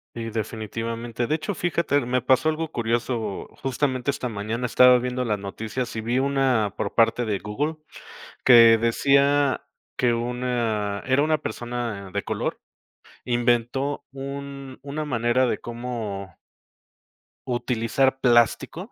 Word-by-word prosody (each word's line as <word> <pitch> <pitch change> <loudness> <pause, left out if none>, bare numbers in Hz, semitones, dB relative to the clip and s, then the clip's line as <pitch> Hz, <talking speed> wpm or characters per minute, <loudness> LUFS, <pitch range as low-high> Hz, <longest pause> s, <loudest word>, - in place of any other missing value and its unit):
Y 115 -1 -5
definitivamente, 115 +2 -4
de 155 - +1
hecho 195 +6 -3
fíjate, 170 -4 0
er 125 -4 -1
me 125 0 0
pasó 130 +4 +3
algo 160 0 -3
curioso, 115 -3 -2
justamente 130 0 -1
esta 130 -2 -1
mañana, 110 +3 -3
estaba 125 +1 +6
viendo 125 +1 -2
las 105 -3 0
noticias, 110 +5 -5
y 110 - -2
vi 120 +3 -1
una 130 -7 +1
por - - -4
parte 115 +1 +3
de 105 -3 0
Google 140 +11 -3 0.7
que 115 -2 +8
decía 140 +4 +2 0.3
que 120 -2 +2
una 115 -4 -1
era 130 +2 +3
una 155 0 +2
persona 120 -8 -5
de - - -1
color. - - -3 0.7
Inventó 120 +3 0
un 140 0 -7
una 150 +2 -4
manera 120 -1 +1
de - - 0
como 115 -6 -6 1.1
utilizar 125 +2 0
plástico 120 -4 +2
120 Hz, 130 wpm, -24 LUFS, 115-135 Hz, 1.1 s, que